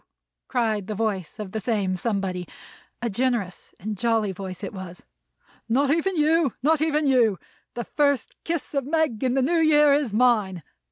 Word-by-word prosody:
cried 220 -6 0
the 215 - -3
voice 200 -5 -2
of 210 -3 -6
this 220 -1 -5
same 200 -6 0
somebody; 185 -3 -2 0.6
a - - +1
generous 235 -4 -2
and 210 0 -5
jolly 225 -3 +1
voice 190 +1 -7
it 195 - -5
was. 185 -2 -9 0.6
"Not 275 +4 +2
even 340 +4 +1
you. 310 -3 +2
Not 310 +1 +3
even 310 -1 +1
you. 240 -7 +3 0.4
The 240 - -3
first 285 -2 0
kiss 330 -3 -3
of 275 -1 0
Meg 295 -4 0
in 255 0 +1
the 265 - +2
New 335 +5 +2
Year 300 -2 +5
is 280 -5 +1
mine. 210 -7 +2
235 Hz, 170 wpm, -24 LUFS, 200-290 Hz, 0.6 s, Year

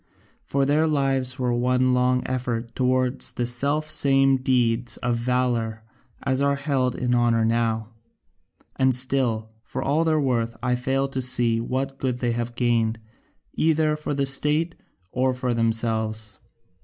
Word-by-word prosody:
For 140 0 0
their 150 +3 +2
lives 135 -3 0
were 125 -2 0
one 125 +1 +1
long 125 0 +2
effort 120 -2 -3
towards 130 0 0
the 120 - -2
self 140 +6 0
same 135 -3 +3
deeds 120 -2 0
of 120 -1 -1
valour 120 -2 -1 0.4
as 130 0 0
are 140 0 +2
held 135 -3 -1
in 125 -1 -1
honour 120 -2 +2
now; 115 -1 0 0.9
and 130 -1 +3
still, 125 -4 +2
for - - -6
all 150 +4 +1
their 160 -1 +2
worth, 120 -4 -1
I 125 0 +1
fail 135 +2 -1
to 135 -1 -3
see 120 -2 +2
what 135 +3 -3
good 125 -2 -1
they 120 -1 -1 0.2
gained 115 -2 +1 0.6
either 155 -1 +1
for 150 -1 -4
the 140 0 0
state 150 +4 +2 0.4
or 130 0 0
for 125 -1 -2
themselves. 110 -2 -1
125 Hz, 145 wpm, -24 LUFS, 120-135 Hz, 0.9 s, same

